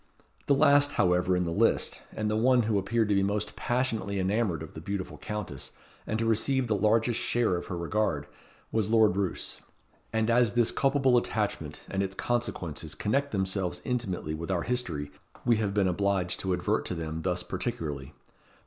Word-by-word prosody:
The 140 - +5
last, 145 0 +5
however, 90 0 +2
in 90 - +1
the 85 - -2
list, - - +1
and 110 - -1
the 105 - 0
one 125 +2 +4
who 105 -2 +1
appeared 110 +3 +1
to - - +3
be 100 - +3
most 100 +2 -1
passionately 120 -5 -1
enamoured 95 -3 0
of 80 - -10
the 80 - -8
beautiful 100 +2 -4
Countess, 105 -10 -5 0.3
and 110 - -1
to 115 - 0
receive 130 +4 +2
the 110 -3 +1
largest 110 +3 +2
share 120 -6 +1
of 85 - -5
her 90 - -4
regard, 85 -4 0 0.5
was 110 -2 0
Lord 110 -4 +5
Roos; 100 -3 -2 0.5
and 110 -1 +1
as 120 -2 +4
this 120 -2 +3
culpable 135 -2 +3
attachment 105 -10 -2
and 95 - -1
its 95 -1 -3
consequences 90 -11 -2
connect 140 +7 0
themselves 95 -2 -1
intimately 105 - -2
with 80 +3 -5
our 90 -3 0
history 85 -13 -2 0.3
we 120 -2 +4
have 105 -2 0
been 100 -2 +3
obliged 95 -1 0
to 95 -1 0
advert 90 +5 0
to 90 - -3
them 80 -1 -4
thus 90 0 0
particularly. 70 -7 -4
100 Hz, 180 wpm, -28 LUFS, 90-115 Hz, 0.5 s, The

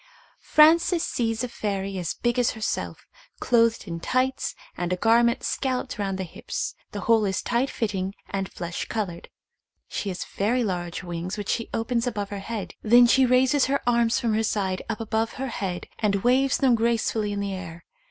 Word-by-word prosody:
Frances 330 +2 +5
sees 225 -1 -1
a - - -1
fairy 195 -4 -3
as 170 -2 -3
big 240 +1 0
as 245 - +2
herself, 215 - -3 0.3
clothed 230 -1 +2
in 170 -1 -4
tights 255 +7 0 0.2
and 175 0 -3
a - - +2
garment 235 +4 +3
scalloped 255 -4 -2
round 195 -2 -1
the 190 - -2
hips; 175 - -4 0.2
the 205 - -5
whole 225 +2 +3
is 195 -1 -1
tight 245 +3 +1
fitting 195 -3 -2
and 195 -1 -3
flesh 175 0 -4
coloured; 190 -7 -4 0.6
she 205 - -3
has 185 - -4
very 235 +5 0
large 175 -3 -3
wings 175 +3 -4
which 205 -2 -5
she 230 - -1
opens 235 +1 -1
above 205 -4 -3
her 200 - -4
head; 210 0 -5
then 240 +3 +7
she 260 +2 +5
raises 260 +2 +4
her 275 +1 +1
arms 235 -1 +3
from 230 -2 0
her 220 - +2
side 195 -4 -1
up 225 - -2
above 225 0 -1
her 270 0 -4
head 185 -6 -4
and 200 -3 +1
waves 260 +2 +3
them 260 -3 +4
gracefully 225 -2 +1
in 205 - -2
the 200 -1 -2
air. 170 -3 -7
220 Hz, 185 wpm, -25 LUFS, 195-240 Hz, 0.6 s, then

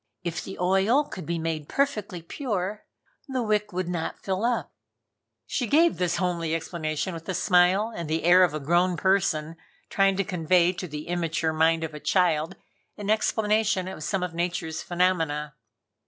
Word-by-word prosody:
If 170 -1 -3
the 190 - -8
oil 195 +10 +3
could 185 - -9
be 170 0 -1
made 160 -2 -3
perfectly 210 -11 -1
pure, 205 - -3 0.4
the 260 -3 -2
wick 210 -1 0
would 185 -1 -2
not 175 -2 -3
fill 190 +1 -2
up." 240 0 0 0.7
She 245 - -2
gave 325 +8 +4
this 175 -1 0
homely 170 -3 -1
explanation 165 +1 -3
with 165 +1 -8
a 190 - -1
smile 185 +5 +3
and 170 -3 -5
the 160 +1 -1
air 180 +2 +7
of 165 -4 +2
a - - -2
grown 175 +4 +2
person 165 -5 +1 0.3
trying 195 -1 +3
to 195 - +2
convey 180 0 +2
to 180 0 -6
the 150 -1 -7
immature 165 -2 -1
mind 160 +1 +2
of 160 -1 -4
a 150 - -7
child 160 -3 +1 0.4
an 205 0 -2
explanation 215 -3 +1
of 185 -5 -7
some 180 +5 -1
of 180 -2 -3
Nature's 170 -2 -2
phenomena. 165 -5 0
180 Hz, 170 wpm, -26 LUFS, 165-195 Hz, 0.7 s, air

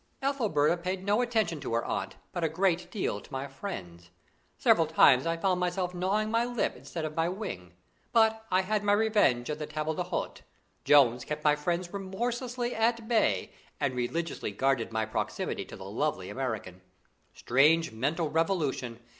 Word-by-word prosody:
Ethelberta 205 - +2
paid 185 +2 -3
no 205 +4 +3
attention 220 -9 0
to 115 - -3
her 115 - 0
aunt, - - -3 0.2
but 175 -2 -3
a 160 - +2
great 175 +1 +1
deal 175 - -2
to - - -17
my 135 +1 -3
friends. 90 - -8 0.5
Several 165 -2 +4
times 145 -3 +5
I 165 0 0
found 180 +1 +1
myself 180 0 -1
gnawing 200 +4 0
my 230 +1 +3
lip 245 -1 -1
instead 140 +6 -6
of 155 0 -5
my 165 +1 +1
wing. 135 - -6 0.4
But 220 -1 +3
I 185 - +3
had 210 +2 -1
my 205 0 +3
revenge 205 - +3
at 150 - -4
the 150 - -4
table 155 +1 -2
d'hôte. - - -3 0.4
Jones 125 -4 +5
kept 150 0 -5
my 150 -1 +5
friends 175 +4 -2
remorselessly 240 +5 -3
at 230 0 +1
bay, 215 - +1 0.3
and 140 -3 0
religiously 125 +7 -2
guarded 125 +2 0
my 110 -1 0
proximity 110 - -3
to - - -10
the - - -10
lovely 95 0 -2
American. 110 -8 -4 0.5
Strange 150 +6 +3
mental 145 +8 -1
revolution! 150 -8 0
165 Hz, 170 wpm, -29 LUFS, 135-205 Hz, 0.5 s, times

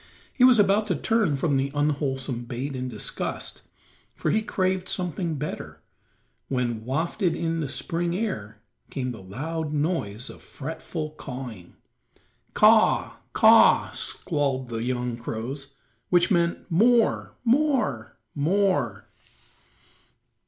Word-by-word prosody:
He 250 - +2
was 250 -2 +8
about 205 +1 +3
to 185 - +1
turn 210 -3 +1
from 140 0 +1
the 135 +1 0
unwholesome 135 -4 -1
bait 130 +4 -4
in 130 0 -3
disgust, 110 -4 -4 0.5
for - - -1
he 220 - +2
craved 185 -3 -1
something 175 -2 -2
better, 150 +2 -6 0.7
when, 120 -4 -1
wafted 165 - 0
on 165 0 -1
the 150 -4 -2
spring 170 +4 -1
air 110 - -4 0.3
came 130 -2 -3
the 110 - -9
loud 150 - -4
noise 145 - -1
of - - -11
fretful 155 +1 -6
cawing. 125 - -8 0.8
"Caw - - +7
r - - +3
r, - - -21
caw - - +4
r - - +8
r," - - -14
squalled 135 -4 -2
the 115 -1 -3
young 125 -1 -2
crows, 135 +5 -6 0.3
which 175 +3 +3
meant, 170 -2 +1
"More, 230 +6 +3
more, 235 - +1 0.2
more." 190 +6 +1
150 Hz, 130 wpm, -25 LUFS, 125-180 Hz, 0.8 s, was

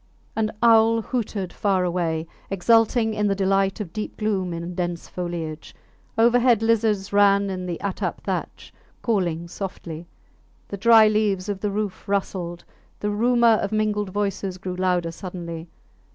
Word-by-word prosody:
An 220 -1 0
owl 225 -1 +5
hooted 205 -7 -3
far 195 -3 +1
away, 170 -3 -1 0.2
exulting 225 +3 +3
in 210 -1 0
the 200 - +1
delight 195 0 +1
of 190 -6 -6
deep 215 - -5
gloom 200 -4 -1
in 170 +1 -5
dense 175 -1 -3
foliage; 170 -3 -5 0.4
overhead 235 0 +4
lizards 215 -3 +1
ran 200 -1 +4
in 185 -1 -4
the 170 -2 -3
attap 200 -2 -2
thatch, - - -4 0.3
calling 175 -7 0
softly; 170 -3 -7 0.6
the - - -4
dry 220 +1 +7
leaves 210 -3 +1
of 200 -2 -2
the 210 - -1
roof 200 -1 -4
rustled; 180 -3 -2 0.3
the 210 - -1
rumour 235 +1 +4
of 200 - -2
mingled 210 -2 0
voices 195 -1 -2
grew 185 0 -5
louder 180 -2 0
suddenly. 170 -2 -7
195 Hz, 145 wpm, -23 LUFS, 180-215 Hz, 0.6 s, dry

